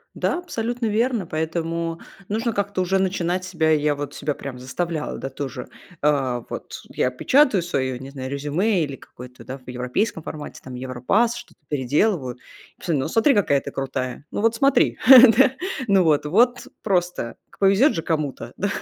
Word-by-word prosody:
Да, 345 - 0
абсолютно 240 -8 -3
верно, 225 -1 0
поэтому 165 +1 -3 0.3
нужно 225 +3 -1
как-то 200 -2 -1
уже 190 +1 +1
начинать 185 -1 -1
себя. 165 -4 +1
Я 150 -1 +2
вот 145 0 -6
себя 150 +1 -2
прям 135 -2 -7
заставляла, 155 +5 -3
да, 135 - -5
тоже. 135 -1 -6 0.3
А 135 -5 +1
вот - - -7
я - - 0
печатаю 240 - +3
свое, 130 -7 -2
не 135 +2 -9
знаю, 130 -2 -6
резюме 160 +8 0
или 140 -3 -5
какое-то 125 +1 -13
да 130 - -6
в 130 -1 -15
европейском 125 - -2
формате 155 -1 -8
там, 130 -1 -8
европасс, 130 - 0
что-то - - -13
переделываю. 145 - 0 0.4
И - - -40
потом: 170 -5 0
"Ну 130 - -1
смотри, 225 - +3
какая 145 -10 +2
ты - - -7
крутая". 130 0 -4
Ну - - -3
вот 225 +1 +3
смотри, 275 +4 +3 0.4
да? 265 0 +6 0.4
Ну 195 -3 +4
вот, 150 -3 +2
вот 240 +10 +2 0.2
просто 175 - -1
к - - -22
повезёт 200 +9 +4
же 165 - -2
кому-то, 155 -4 -3
да? - - -1
165 Hz, 170 wpm, -23 LUFS, 135-200 Hz, 0.4 s, да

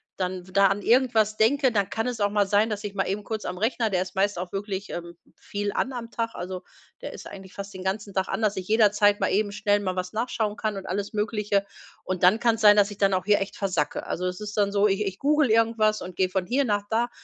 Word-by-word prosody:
dann 185 -1 -4
w - - -14
da 200 +1 +5
an 195 +1 -1
irgendwas 225 -3 +3
denke, 260 +4 +3
dann 200 -4 0
kann 225 - -2
es 245 -2 -3
auch 205 - +3
mal 205 0 +2
sein, 205 +3 +2
dass 210 -1 -4
ich 205 -1 -5
mal 195 -1 -1
eben 200 +2 -2
kurz 220 0 -5
am 180 - -4
Rechner, 225 +2 0
der 185 -2 +1
ist 185 - -11
meist 200 0 +1
auch 180 +1 -5
wirklich, 195 0 -4
ähm, 170 0 -7 0.2
viel 205 0 -4
an 265 - -1
am 235 -2 -7
Tag, 230 0 -3
also, 180 +1 -5 0.4
der - - -6
ist - - -10
eigentlich 190 -1 -11
fast 200 0 -7
den 185 -1 -8
ganzen 200 +1 -3
Tag 190 0 0
an, 225 - -3
dass 210 -1 +2
ich 185 -1 -5
jederzeit 205 -2 +4
mal - - 0
eben 205 0 +1
schnell 205 0 +1
mal 185 -2 -3
was 180 0 -4
nachschauen 220 -2 -1
kann 215 -2 -3
und 195 - -7
alles 200 +3 -3
Mögliche. 210 -2 0 0.4
Und 185 -1 -3
dann 185 +5 +5
kann 230 -1 +3
es 225 - -8
sein, 210 -1 +8
dass 205 0 +4
ich 205 - -10
dann 195 -1 +3
auch 185 0 -2
hier 205 0 +3
echt 195 - -4
versacke. 180 -7 -2
Also, 180 +1 -2
es 180 +1 -4
ist 210 0 -6
dann 205 -1 +2
so, 205 +1 +3
ich 200 +1 0
ich 195 -2 -4
google 295 0 +2
irgendwas 220 -1 +2
und 180 -1 -8
gehe 185 -1 +1
von 185 -1 -1
hier 260 +8 +1
nach 205 -5 0
da, 235 +2 +1
205 Hz, 270 wpm, -25 LUFS, 190-220 Hz, 0.4 s, sein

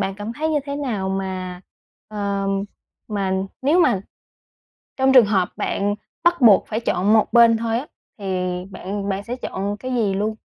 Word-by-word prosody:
bạn 195 -1 -1
cảm 205 +3 -6
thấy 310 +6 -2
như 305 - +2
thế 280 0 -4
nào 230 -10 -2
mà, 185 -2 -4 0.5
ờ, 200 -2 -2 0.6
mà 200 -3 -1 0.3
nếu 315 +7 +4
mà 235 - +3 1.0
trong 265 0 +3
trường 250 -4 +8
hợp 195 -3 +1
bạn 205 +1 -1 0.3
bắt 345 -2 +3
buộc 215 -6 +6
phải 220 +1 -2
chọn 205 -2 +1
một 220 -1 +3
bên 235 -1 +6
thôi 225 0 -1
á 285 - -8 0.3
thì 200 - -9 0.5
bạn 200 +2 -5
bạn 195 +1 -2
sẽ 240 +3 -4
chọn 205 -4 -4
cái 255 +4 -5
gì 215 -5 +1
luôn? 210 +3 -1
210 Hz, 175 wpm, -21 LUFS, 195-240 Hz, 1.0 s, trường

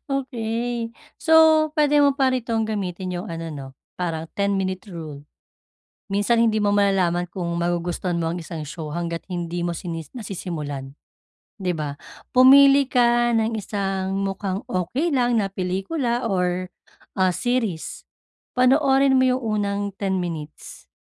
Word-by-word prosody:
Okey. 235 -3 -2 0.2
So, 320 -1 +5
pwede 295 -1 +3
mo 280 -1 +4
pa 265 -2 +2
rin 255 -2 -1
tong 225 -1 0
gamitin 185 -3 -3
yung 185 - -6
ano 165 -3 -5
'no, 140 -3 -7 0.3
parang 165 -2 -2
10 200 0 0
minute 190 +1 -2
rule. 155 -5 -8 0.8
Minsan 205 +4 +2
hindi 220 -2 +2
mo 205 -1 +2
malalaman 185 -3 +2
kung 180 -3 -4
magugustuhan 175 +1 -1
mo 165 0 -1
ang - - -4
isang 160 -2 -6
show 160 +1 -6
hangga't 170 +1 -3
hindi 175 -1 -3
mo 175 0 -1
sini 165 -1 -5 0.2
nasisimulan, 150 - -5 0.6
di 185 -3 -2
ba? 150 -3 -4 0.4
Pumili 275 +2 +8
ka 240 -1 +3
ng 225 0 +1
isang 195 -2 -2
mukhang 195 0 -2
okey 240 - -1
lang 245 -2 +2
na 200 - 0
pelikula 230 - -2
or, 180 -1 0 0.5
ah, 185 -1 +3
series. 225 -6 -2 0.5
Panoorin 270 +1 +4
mo 260 - +4
yung 255 0 0 0.2
unang 200 0 -1 0.2
10 190 -2 -1
minutes. 155 -3 -7
195 Hz, 145 wpm, -23 LUFS, 175-240 Hz, 0.8 s, Pumili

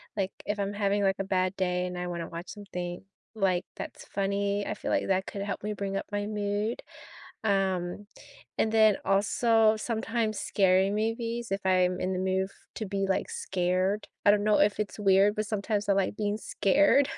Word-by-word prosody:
like, 195 -2 -1
if 205 0 -2
I'm 200 0 -1
having, 205 0 +1
like, 195 0 +2
a - - 0
bad 185 -1 0
day 180 -1 0
and 180 0 -6
I 180 0 -3
wanna 170 -1 -4
watch 170 +1 -7
something, 180 -4 -6 0.3
like, 185 -3 +1
that's - - -8
funny, 200 +1 -1
I - - -3
feel - - -4
like - - +1
that 190 0 +1
could 200 - -6
help 200 0 -3
me 210 +1 -3
bring 195 -1 -3
up - - -3
my 205 0 -2
mood, 210 +2 -2 0.6
um, 195 -1 0 0.5
and 220 - +2
then 220 -2 +5
also, 220 +3 +3
sometimes 225 -1 -1
scary 190 0 +3
movies 230 +2 -2
if 195 0 -2
I'm 185 -1 +2
in 185 +1 -1
the - - -2
mood 190 0 0
f - - -21 0.2
to 220 - -3
be, 195 0 -1
like, 190 - -1
scared, 185 +3 -1 0.2
I 205 - +7
don't 205 0 +2
know 210 -1 +3
if 200 +1 +3
it's 210 0 -3
weird, 200 0 +4
but 215 0 -1
sometimes 205 0 -2
I - - +5
like 195 +1 0
being 205 -1 -1
scared. 280 +6 +3
200 Hz, 195 wpm, -28 LUFS, 190-210 Hz, 0.6 s, I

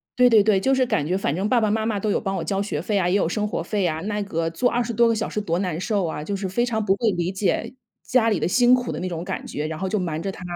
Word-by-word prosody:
对 250 -1 +5
对 215 -3 +6
对， 210 -2 +3
就 270 +4 +2
是 260 -1 +2
感 150 -11 0
觉 185 +3 0
反 155 -6 -1
正 200 +4 -1
爸 250 - +4
爸 215 - +2
妈 220 0 0
妈 215 -3 -1
都 210 +1 -1
有 - - 0
帮 195 -2 -2
我 165 - -3
交 195 +4 -1
学 160 -7 -3
费 205 +3 -1
啊， 180 - +1
也 180 - +2
有 200 - +2
生 210 +2 -1
活 200 - -3
费 200 +1 -1
啊， 160 -1 -2
那 210 +3 -2
个 165 -4 -2
坐 245 +9 +1
20 240 -1 -1
多 235 +2 +4
个 230 - +2
小 220 - -2
时 210 - -2
多 170 -3 -1
难 180 -4 -2
受 200 -2 0
啊。 150 -2 -4
就 200 - -4
是 195 -1 -3
非 240 +6 +1
常 220 -3 -1
不 195 - +3
会 225 +2 +1
理 175 -1 -1
解 210 +5 -1 0.3
家 235 -2 +2
里 205 - +1
的 - - 0
辛 245 +5 +4
苦 250 -1 -3
的 - - -5
那 185 - -2
种 170 -1 -4
感 - - -4
觉， 150 +1 -3
然 160 - -5
后 190 - -2
就 210 +1 0
瞒 165 -3 -3
着 195 +2 -3
他 190 - -12
200 Hz, 355 characters per minute, -23 LUFS, 180-225 Hz, 0.3 s, 对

